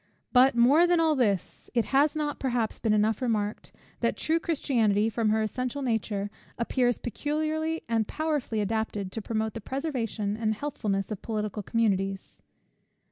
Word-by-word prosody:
But, 255 0 +6
more 275 +9 +6
than 350 -1 +3
all 320 -2 +3
this; 210 -8 -1
it 235 - +3
has 290 +3 +4
not 295 -2 -2
perhaps 240 -4 -1
been 220 - +1
enough 215 +1 +2
remarked, 215 -4 -1 0.3
that - - 0
true 325 +1 +1
Christianity, 225 -10 +1
from 225 -1 +1
her 220 +1 +2
essential 255 +5 -3
nature, 210 -4 -1 0.3
appears 245 0 +1
peculiarly 310 +5 -2
and 225 -2 +1
powerfully 295 -8 -1
adapted 210 -2 -2
to 225 - -4
promote 220 0 -2
the 225 - -6
preservation 230 -6 -2
and 220 -1 0
healthfulness 210 -7 -2
of 210 - -4
political 215 -1 -3
communities. 195 -3 -1
230 Hz, 150 wpm, -28 LUFS, 215-275 Hz, 0.3 s, But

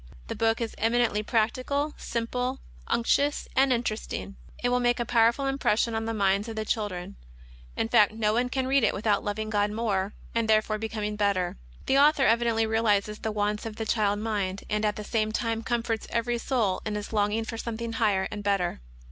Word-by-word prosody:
The - - -3
book 225 0 +1
is 230 - -2
eminently 230 -1 +2
practical, 255 +7 0
simple, 250 +3 -2 0.3
unctuous, 285 +5 +1
and 265 0 +4
interesting. 220 -4 -2 0.3
It 245 - +2
will 250 0 +2
make 240 0 +2
a 240 - 0
powerful 235 +4 +3
impression 245 -4 +1
on 225 0 -2
the 225 - -2
minds 200 +1 +1
of 225 - -6
the 220 0 -3
children. 205 - -3 0.6
In - - 0
fact 205 - +5
no 215 -1 0
one 245 +2 +1
can 265 0 -1
read 270 0 +3
it 215 - +2
without 210 +1 +1
loving 215 +1 -3
God 205 -1 +2
more, 210 -3 -1 0.2
and 230 -1 0
therefore 215 0 +2
becoming 210 -1 -3
better. 200 -4 +1 0.3
The 270 - +3
Author 290 -1 +5
evidently 230 0 +3
realizes 215 -2 +1
the 220 - -2
wants 210 0 -1
of 220 - -7
the 225 0 -4
child 205 -2 +1
mind, 205 -3 -2
and, 210 0 +1
at 210 - +1
the 210 - -6
same 215 0 0
time, 225 -1 -1
comforts 230 -1 -2
every 235 0 -1
soul 230 -8 0
in 210 -1 -2
its 210 +2 -6
longing 210 +1 +1
for 225 0 -5
something 230 0 -4
higher 205 -4 +1
and 210 - -5
better. 195 - 0
220 Hz, 195 wpm, -27 LUFS, 210-235 Hz, 0.6 s, fact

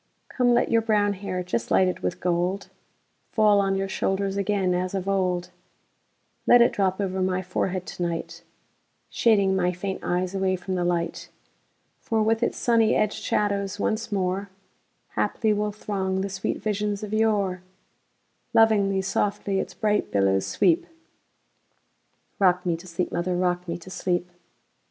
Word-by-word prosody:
Come, 245 -1 +2
let 240 - +1
your 230 - +4
brown 210 -2 +2
hair, 185 -2 -4
just 180 +6 -3
lighted 185 -1 +2
with - - -3
gold, 180 +3 -1 0.6
Fall 210 -2 +4
on 195 -1 +1
your 195 0 -1
shoulders 195 0 -1
again 200 -2 +1
as 180 +2 -2
of 190 0 -3
old; 180 -2 0 1.0
Let 245 - +8
it 235 - +5
drop 190 -1 0
over 190 -1 -1
my 185 0 0
forehead 185 0 -2
to - - -8
night, 170 -1 -3 0.7
Shading 200 -4 +3
my 180 -1 +1
faint 190 +2 -4
eyes 180 +1 -1
away 190 -1 +1
from 185 +1 -5
the 180 -1 0
light; 175 -1 -2 0.7
For 225 -1 0
with 225 +1 +1
its 235 - 0
sunny 230 -2 +3
edged 215 -1 0
shadows 200 -1 -1
once 220 +2 -1
moreHaply 195 +2 -3
will 210 0 -1
throng 190 -2 -2
the 200 - -2
sweet 190 0 -2
visions 210 -1 -1
of 210 0 -5
yore; 205 -4 +1 0.9
Lovingly, 200 -4 +4
softly, 200 0 -1
its - - -5
bright 210 -2 0
billows 95 -1 +2
sweep;—Rock 325 - -3
me 175 -2 +1
to 170 +3 -11
sleep, 175 +1 -3
mother,—rock 180 0 -1
me 170 0 -3
to 180 +2 -12
sleep! 180 -1 -1
195 Hz, 145 wpm, -25 LUFS, 180-210 Hz, 1.0 s, Let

